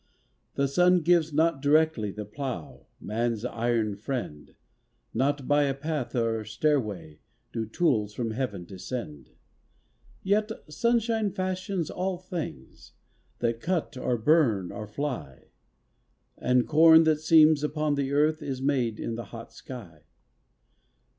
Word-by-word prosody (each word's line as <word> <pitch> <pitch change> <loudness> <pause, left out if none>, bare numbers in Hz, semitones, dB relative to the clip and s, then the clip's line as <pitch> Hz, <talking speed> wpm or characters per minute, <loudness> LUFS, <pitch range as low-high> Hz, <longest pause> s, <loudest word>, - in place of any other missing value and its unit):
The 140 - +1
sun 180 +5 +4
gives 165 -1 +3
not 160 -1 +2
directly 150 -6 +3
The 105 +1 -6
plough, 125 - -6
man's 115 +1 -2
iron 115 -3 0
friend; 105 - -5 0.6
Not 140 +2 0
by 145 0 +4
a 135 -1 -1
path 145 -2 -3
or 115 -2 0
stairway 110 - -1 0.3
Do 110 -1 -3
tools 110 -6 0
from 115 -2 -2
Heaven 110 -7 -3
descend. 95 - -7 0.9
Yet 210 +3 +1 0.2
sunshine 230 +4 +1
fashions 185 -2 -3
all 185 0 -2
things 170 - -7 0.5
That 115 -1 0
cut 170 -5 -1
or 125 -1 -1
burn 115 - +2
or 105 +1 -7
fly; 105 - -5 0.9
And 125 0 +1
corn 160 +1 +7
that 155 -1 +2
seems 155 -2 +5
upon 150 0 0
the 140 -1 -1
earth 155 +2 +2
Is 135 -3 -4
made 130 -5 0
in 115 - -3
the 115 0 -5
hot 115 +3 -10
sky. 95 - -10
135 Hz, 125 wpm, -27 LUFS, 110-160 Hz, 0.9 s, corn